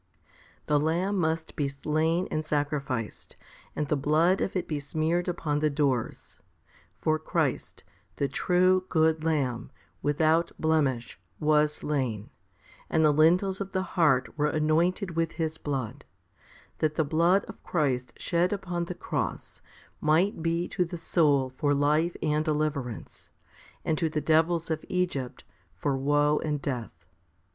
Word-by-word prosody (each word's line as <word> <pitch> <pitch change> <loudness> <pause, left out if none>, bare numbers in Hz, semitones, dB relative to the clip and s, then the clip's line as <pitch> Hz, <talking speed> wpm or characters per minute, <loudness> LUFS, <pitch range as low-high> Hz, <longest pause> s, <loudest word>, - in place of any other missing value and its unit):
8. - - -38
The 150 -1 +2
lamb 170 +7 0
must 160 -1 -1
be 145 - 0
slain 155 +5 0
and 155 - -1
sacrificed, 145 -6 -3 0.4
and 150 - -1
the 150 - +1
blood 155 +6 +2
of 195 - -2
it 185 - -1
be 150 -2 -2
smeared 160 +5 -1
upon 160 -4 -1
the 155 0 +2
doors: 140 -5 -2 0.6
for 155 0 +1
Christ, 155 -3 -2 0.3
the 140 - 0
true, 185 +4 +2
good 160 -1 +2
Lamb, 135 -6 -1 0.3
without 160 +3 +2
blemish, 145 -7 0 0.2
was 150 -1 +3
slain, 130 -8 -2 0.6
and 160 0 +3
the 150 - +5
lintels 180 +6 +3
of 195 -1 -5
the 185 - 0
heart 135 -7 +2
were 150 - +3
anointed 165 +5 +1
with 165 0 0
His 160 -1 -3
blood, 135 -2 -4 0.8
that 155 -1 0
the 160 - +1
blood 170 +6 +3
of - - -11
Christ 135 -7 -1
shed 175 +1 +1
upon 180 -4 -2
the 180 - -6
cross - - -4 0.4
might 165 +5 +2
be 170 +1 0
to 180 - 0
the 175 0 -6
soul 145 -6 +2
for 145 -1 +2
life 150 +4 +2
and 150 0 +1
deliverance, 150 -6 -3 0.6
and 155 - 0
to 165 - +1
the 155 0 -1
devils 165 +2 +2
of 155 0 -2
Egypt 180 -9 -2 0.3
for 140 -2 -1
woe 145 +2 +2
and 150 -2 -1
death. 115 - -5
155 Hz, 145 wpm, -28 LUFS, 145-170 Hz, 0.8 s, the